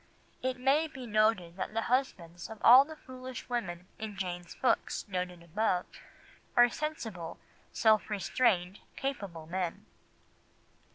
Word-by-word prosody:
It 255 0 -1
may 280 +5 +3
be 265 -5 -9
noted 215 -6 +2
that 215 - -4
the 225 - +1
husbands 180 -10 -1
of 220 - -8
all 255 +3 +10
the 315 +2 -10
foolish 255 -3 -9
women 180 -8 -3
in 215 -2 -6
Jane's 175 -2 -4
books 255 - 0
noted 180 -2 -4
above 180 +1 0 0.7
are 240 0 +8
sensible, 225 - -5 0.3
self 220 -1 +3
restrained, 200 -3 +1 0.2
capable 200 - -4
men. 175 0 -3
215 Hz, 125 wpm, -31 LUFS, 180-255 Hz, 0.7 s, all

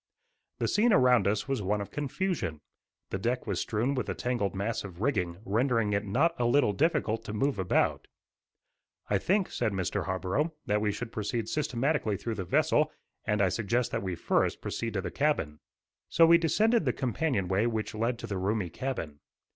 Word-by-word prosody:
The - - 0
scene 225 +3 +3
around 125 - +5
us 105 +3 0
was 135 -5 -1
one 105 +2 0
of 100 - -6
confusion. 145 - -2 0.5
The 95 - -2
deck 120 +5 -1
was 100 -6 -2
strewn 115 +5 0
with 130 - -2
a - - -2
tangled 120 -6 -1
mass 105 +4 -2
of 90 -4 -9
rigging, 90 -9 0
rendering 115 0 +1
it 100 +1 +1
not 150 +12 +2
a 120 - +2
little 120 -3 +3
difficult 135 - +1
to 105 - -5
move 135 +1 0
about. 95 - +1 1.0
"I 100 - +3
think," 190 - +1
said 110 -4 -1
Mr. 95 -2 -2
Harborough, 100 - -1
"that 105 0 +1
we 105 -1 +1
should 115 +3 -6
proceed 110 +1 -3
systematically 140 -6 0
through 115 +4 -3
the 95 -4 -4
vessel, 155 - +2 0.3
and 105 -2 +2
I 95 - +3
suggest 115 +5 0
that - - -1
we 95 -2 -3
first - - +1
proceed - - -4
to - - 0
the - - -5
cabin." 75 0 0 0.5
So 165 - +6
we 170 +1 +7
descended 215 +5 +2
the 125 - +2
companionway 120 - 0
which 110 -2 -2
led 115 +3 -1
to - - -7
the 100 -2 -3
roomy 95 -2 -1
cabin. 100 - -4
115 Hz, 185 wpm, -29 LUFS, 100-140 Hz, 1.0 s, we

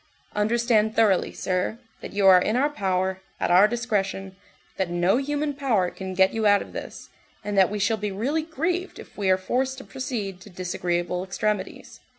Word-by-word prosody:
"Understand 220 0 +2
thoroughly, 210 -5 +3
sir, 185 +4 -2 0.2
that - - -7
you 200 -1 0
are 185 -1 +8
in 215 - 0
our 285 +4 +2
power, 190 -5 -1 0.2
at - - 0
our 185 +4 +7
discretion, 200 -5 -2 0.4
that 190 -2 -1
no 175 +5 +2
human 290 +2 -1
power 235 -11 +1
can 190 -1 -6
get 190 +1 +4
you 220 -1 +1
out 205 0 +4
of - - -15
this, - - -8 0.3
and 205 0 -3
that 190 -2 +5
we 210 - -3
shall 205 +2 +1
be 210 -1 -3
really 260 +11 -1
grieved 335 +4 -2
if - - -12
we 200 -2 -1
are 185 - +5
forced 260 +7 -1
to 265 - -9
proceed 230 -9 -5
to 205 - -12
disagreeable 180 -1 -2
extremities. 200 +1 -3
205 Hz, 185 wpm, -25 LUFS, 190-240 Hz, 0.4 s, are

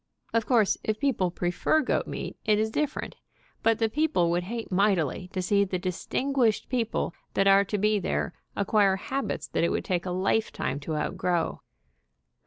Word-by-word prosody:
Of 230 -1 +1
course, 225 -6 +3
if 215 0 -1
people 235 -10 +1
prefer 180 - +1
goat 265 - 0
meat, - - -5
it 215 -2 +3
is 220 +1 0
different, 300 +4 -2 0.4
but 225 -1 +3
the 225 -1 +2
people 280 - +1
would 175 +1 0
hate 230 +2 -5
mightily 185 -3 +1
to 185 -2 -2
see 200 +2 +3
the 185 -2 -2
distin 185 +9 -2
guished 235 -6 +2
people 230 -8 -1 0.2
that 195 - +3
are 195 0 +6
to 210 - -2
be 210 +1 +2
there - - -2 0.2
acquire 200 -1 +3
habits 270 +8 -3
that - - 0
it 170 - +3
would - - -2
take 180 0 -1
a - - -1
lifetime 185 -6 0
to 155 +2 -4
outgrow. 165 +2 -1
200 Hz, 180 wpm, -27 LUFS, 180-225 Hz, 0.4 s, are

